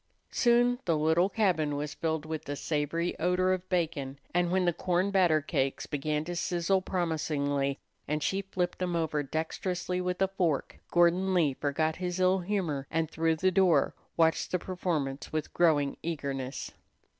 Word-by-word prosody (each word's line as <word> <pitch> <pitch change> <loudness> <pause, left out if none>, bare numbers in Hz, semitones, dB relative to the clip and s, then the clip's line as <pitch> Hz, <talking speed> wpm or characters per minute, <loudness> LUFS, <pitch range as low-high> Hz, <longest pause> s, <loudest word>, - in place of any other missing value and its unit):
Soon 245 0 +3
the 165 -3 +2
little 160 +5 +3
cabin 175 -9 +1
was 145 +1 -3
filled 160 -2 -2
with 155 -1 -5
the 145 - -3
savory 155 +4 -1
odor 180 +2 +2
of 185 0 -4
bacon, 155 -6 -1 0.2
and 175 0 +2
when 185 0 +2
the 175 - +2
corn 180 +3 0
battercakes 155 -7 +1
began 150 +1 -1
to 175 +1 -4
sizzle 175 +2 +1
promisingly, 145 -6 -1 0.3
and 150 0 -1
she 195 +1 0
flipped 185 -2 -3
them 180 -2 -1
over 160 -3 0
dexterously 175 +5 -2
with 180 0 -2
a 195 - +3
fork, 180 -7 -1
Gordon 175 +2 +3
Lee 155 -6 +3
forgot 155 +3 -1
his 180 0 -3
ill 185 +1 +4
humor, 175 -8 -2
and 165 -1 -1
through 165 0 +1
the 185 +4 +2
door 185 -2 +3 0.2
watched 165 -1 +3
the 180 - +1
performance 165 -7 -3
with 155 0 -3
growing 150 -5 +3
eagerness. 140 -5 -4
170 Hz, 160 wpm, -29 LUFS, 150-185 Hz, 0.3 s, ill